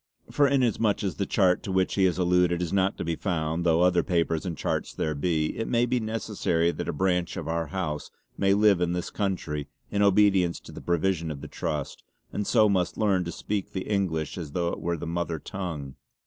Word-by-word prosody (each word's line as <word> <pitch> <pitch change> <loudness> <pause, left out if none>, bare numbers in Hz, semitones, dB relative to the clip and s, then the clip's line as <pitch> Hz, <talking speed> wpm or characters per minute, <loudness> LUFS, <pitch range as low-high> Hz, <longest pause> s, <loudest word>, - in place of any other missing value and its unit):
For 145 -1 +4
inasmuch 120 -7 +2
as 95 - -2
the 100 - -1
chart 95 -3 +3
to 95 - -5
which 95 0 +1
he 95 - +3
has 90 -2 +1
alluded 90 -1 +3
is 90 0 -2
not 95 0 +2
to - - -3
be 85 0 -1
found, 80 -2 -1
though 85 0 +3
other 90 -1 +4
papers 85 -1 0
and 85 -3 -4
charts - - -2
there 80 - -1
be, 75 +1 0
it 115 - -3
may 120 0 +2
be 125 0 0
necessary 105 -7 0
that - - -5
a - - +2
branch 90 -2 0
of - - -5
our 80 -1 -1
house 75 -3 -3 0.3
may 100 0 +3
live 100 -3 +4
in 90 0 +1
this 90 +1 -3
country 85 -7 -2 0.2
in 100 - +1
obedience 100 -3 +4
to - - -12
the - - -9
provision 85 -1 0
of 70 -3 -6
the 75 - -7
Trust 75 0 -4 0.3
and 105 - -2
so 110 -3 +5
must 95 -3 0
learn 100 -4 +2
to 85 - -4
speak 100 +1 -4
the 95 - -4
English 90 -6 -1
as 75 -4 -7
though 85 -1 0
it - - -4
were 85 0 -1
the 85 - -6
mother 85 0 -2
tongue. 80 -7 -5
90 Hz, 220 wpm, -27 LUFS, 85-100 Hz, 0.3 s, so